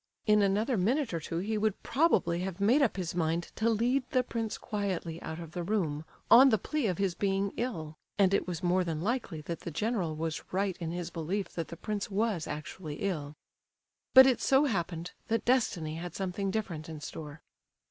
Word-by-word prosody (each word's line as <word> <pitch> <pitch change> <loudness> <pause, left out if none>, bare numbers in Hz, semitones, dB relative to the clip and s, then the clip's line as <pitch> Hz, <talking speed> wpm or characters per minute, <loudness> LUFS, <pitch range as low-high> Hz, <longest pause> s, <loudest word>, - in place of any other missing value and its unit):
In 210 -1 +5
another 210 +5 +2
minute 235 - +1
or 165 - 0
two 165 +1 -4
he 210 +5 -1
would 215 -1 0
probably 265 - +2
have 185 0 -4
made 235 +9 +4
up 240 -7 +2
his 180 -3 -2
mind 170 0 -1
to 225 +1 +1
lead 240 +4 +2
the 255 -1 +2
prince 225 -3 -3
quietly 190 -6 -3
out 160 +1 -5
of 165 -2 -8
the 175 - -4
room, 165 -6 -1 0.3
on 265 +3 +9
the 220 - +4
plea 300 +2 -1
of 180 -4 -1
his 195 -3 +1
being 195 +1 0
ill 160 - -4 0.2
(and 195 -1 +4
it 200 - +1
was 175 -1 -4
more 180 +1 +3
than 165 -3 -3
likely 195 -4 -2
that 170 +2 -5
the - - -6
general 180 -1 -1
was 160 0 -3
right 190 0 0
in 170 -3 -4
his 175 0 -4
belief 175 +4 -2
that 165 -2 -4
the 170 - -9
prince 210 +3 -3
was 205 -4 0
actually 150 +1 -6
ill), 155 -5 -3 0.8
but 260 0 +12
it 260 -2 +3
so 270 +2 +4
happened 175 - -2 0.2
that 225 +1 0
destiny 190 -11 +1
had 175 0 -6
something 195 +1 -2
different 180 -7 -3
in 160 -1 -6
store. 150 0 -8
190 Hz, 200 wpm, -30 LUFS, 165-220 Hz, 0.8 s, but